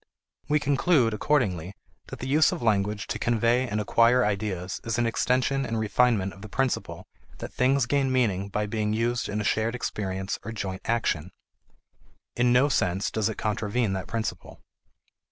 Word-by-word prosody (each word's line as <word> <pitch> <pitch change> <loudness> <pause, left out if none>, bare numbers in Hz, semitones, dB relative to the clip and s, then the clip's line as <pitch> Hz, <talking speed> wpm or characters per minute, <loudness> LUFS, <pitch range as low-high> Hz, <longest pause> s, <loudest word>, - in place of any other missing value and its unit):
We 150 +1 +3
conclude, 140 -4 +2
accordingly, 100 - 0 0.3
that - - -8
the 130 - -6
use 155 +6 +4
of 175 -8 -5
language 105 -2 +1
to - - -4
convey 120 +2 +2
and 105 -1 -2
acquire 115 +4 +3
ideas 100 -3 -3
is 115 0 -2
an 120 - +1
extension 130 +4 +1
and 115 -3 -2
refinement 110 -2 +1
of 95 - -14
the 110 - -9
principle 135 +3 -2 0.3
that - - -8
things 135 +1 +2
gain 135 +1 +1
meaning 100 -7 +1
by 105 +2 -1
being 105 0 -1
used 120 +1 -1
in 105 +1 -2
a - - -1
shared 110 +3 0
experience 95 -5 -3
or 110 - -6
joint 95 -3 -4
action; 100 -8 0 1.1
in 120 0 +3
no 125 +3 +5
sense 95 -8 0
does 110 -1 0
it 110 - -5
contravene 105 0 -1
that 95 -1 -4
principle. 115 -2 -5
115 Hz, 170 wpm, -26 LUFS, 100-125 Hz, 1.1 s, no